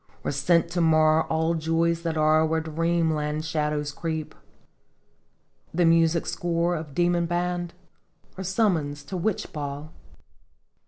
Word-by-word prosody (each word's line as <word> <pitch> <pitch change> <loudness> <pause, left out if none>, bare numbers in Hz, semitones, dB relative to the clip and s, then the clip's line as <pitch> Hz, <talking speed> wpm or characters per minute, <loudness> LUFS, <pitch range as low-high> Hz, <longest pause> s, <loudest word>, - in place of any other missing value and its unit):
Or - - -1
sent 165 +4 +2
to 175 0 0
mar 155 -1 +4
all 160 +1 +1
joys 165 +1 0
that 165 -1 -2
are 155 +1 +4
Where 160 0 +1
Dream 165 +1 0
land 150 +1 -2
shadows 150 -1 -1
creep 160 0 -4
r - - -27 0.7
" - - -41
The 175 0 +3
music 165 0 +3
score 175 0 0
of 155 -4 -7
demon 175 -1 +2
band? 175 0 -2 0.6
Or 190 - -6
summons 170 -7 0
to 155 +7 -7
witch 185 +3 -2
ball? 145 +1 -6
165 Hz, 145 wpm, -25 LUFS, 155-170 Hz, 0.7 s, mar